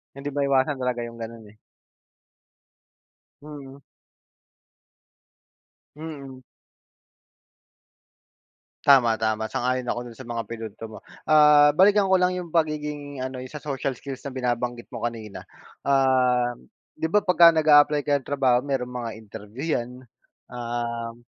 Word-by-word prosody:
Hindi 140 +1 -6
maiwasan 140 0 +1
talaga 125 -2 -2
'yong 115 0 -9
gano'n, 115 0 -8
eh. 105 - -25 1.8
Mm. 140 -2 -11 2.2
Mm. 140 -5 -9 2.4
Tama, 125 -5 +5
tama. 110 0 -1
Sang-ayon 125 +2 -2
ako 120 - -1
do'n 115 - -14
sa 130 - -11
mga 115 -1 -3
pinunto 115 -1 -8
mo. - - -10 0.3
Ah, 150 -1 +7
balikan 195 +4 +4
ko 190 - +6
lang 180 0 +1
'yong 175 -2 -6
pagiging 150 -4 -2
ano, 130 0 -5
'yong 130 0 -9
sa 150 - -8
social 135 -2 -3
skills 135 +1 -8
na 140 - -5
binabanggit 120 -1 -3
mo - - -6
kanina. 110 -3 -6 0.4
Ah, 130 -3 +2 0.5
'di 160 - -1
ba 210 -1 +3
pagka 175 -3 +6
nag-a-apply 150 -1 +5
ka 145 - 0
ng - - -19
trabaho 130 -3 +2
mayroong 130 -3 -2
mga 120 -2 -4
interview 110 +3 -10
'yan, 120 0 -5 0.6
um, 120 -1 -4
130 Hz, 125 wpm, -24 LUFS, 120-145 Hz, 2.4 s, Ah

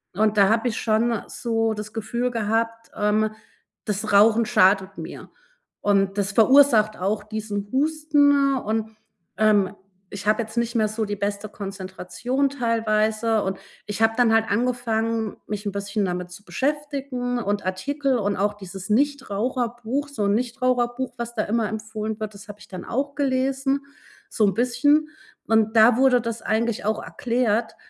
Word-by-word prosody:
Und 215 +1 +2
da 200 -1 +6
habe 225 +2 +2
ich 220 - -4
schon 225 0 +1
so 225 -2 -1
das 210 0 -7
Gefühl 235 +3 -2
gehabt, 230 0 -1
ähm: 210 +1 +1 0.5
Das 210 0 -2
Rauchen 220 +3 +5
schadet 195 -4 +3
mir. - - -8 0.5
Und 195 -1 +2
das 200 0 0
verursacht 225 -2 +5
auch 200 +4 -1
diesen 210 -2 -4
Husten 285 -1 +3
und, 220 -2 -2 0.5
ähm, 205 -2 +3 0.4
ich 200 -1 -7
habe 215 +2 +3
jetzt 220 +1 -8
nicht 235 0 0
mehr 220 -2 +3
so 215 +1 -2
die 205 0 -3
beste 205 +1 -3
Konzentration 195 +7 -3
teilweise, 225 -3 +1
und 190 0 -3 0.3
ich 205 +1 -4
habe 225 0 +4
dann 240 -3 +4
halt 225 0 +4
angefangen, 230 -1 -1
mich 210 0 -5
'n - - -1
bisschen 200 +1 -2
damit 180 -1 -4
zu 180 +3 -12
beschäftigen 275 -3 -2
und 205 -2 -1
Artikel 270 +9 -1
und 205 -1 0
auch 205 +2 0
dieses 195 -1 -9
Nichtraucherbuch, 250 +1 -1
so 280 -7 -3
'n 200 - +2
Nichtraucherbuch, 250 +1 -1
was 235 0 -5
da 215 - 0
immer 225 0 0
empfohlen 220 0 -5
wird, 215 -1 -5
das 210 +3 -12
habe 205 - -8
ich - - -15
dann 185 -2 -7
auch 280 +4 -2
gelesen 270 0 0 0.5
so 215 - +2
'n 195 - +1
bisschen. 290 +6 +2 0.4
Und 220 0 +2
da 225 +2 +7
wurde 255 -2 +4
das 230 0 -4
eigentlich 220 -1 -1
auch 215 +1 -1
erklärt, 235 -2 -1
225 Hz, 160 wpm, -23 LUFS, 210-245 Hz, 0.5 s, da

